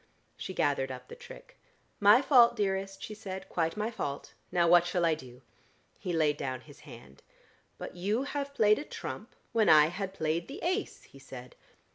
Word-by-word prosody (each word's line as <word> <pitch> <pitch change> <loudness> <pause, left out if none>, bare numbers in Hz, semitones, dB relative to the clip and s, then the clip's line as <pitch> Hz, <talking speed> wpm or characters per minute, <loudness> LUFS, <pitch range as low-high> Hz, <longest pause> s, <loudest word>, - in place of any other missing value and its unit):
She 190 - -7
gathered 135 -2 0
up 125 0 -9
the - - -9
trick. - - -14 0.4
"My 210 +6 +6
fault, 245 -4 +6
dearest," 195 -2 -2
she 215 - -6
said. 195 -3 -7
"Quite 165 +2 -1
my 215 +2 -2
fault. 140 -10 -5 0.2
Now 175 -1 +3
what 175 0 +6
shall 175 -1 0
I 165 - +3
do?" 130 -4 -10 0.6
He 180 - -4
laid 155 -3 +1
down 130 -3 -4
his 145 +1 -16
hand. 120 - -14 0.6
"But - - -8
you 205 +8 -1
have 280 0 -4
played 215 -1 +4
a - - -5
trump - - -8 0.2
when 225 -2 +3
I 155 0 +7
had 190 +2 -5
played 160 0 -1
the 275 - -8
ace," 370 +4 -2
he 140 - -17
said. 130 -2 -11
175 Hz, 185 wpm, -30 LUFS, 145-215 Hz, 0.6 s, I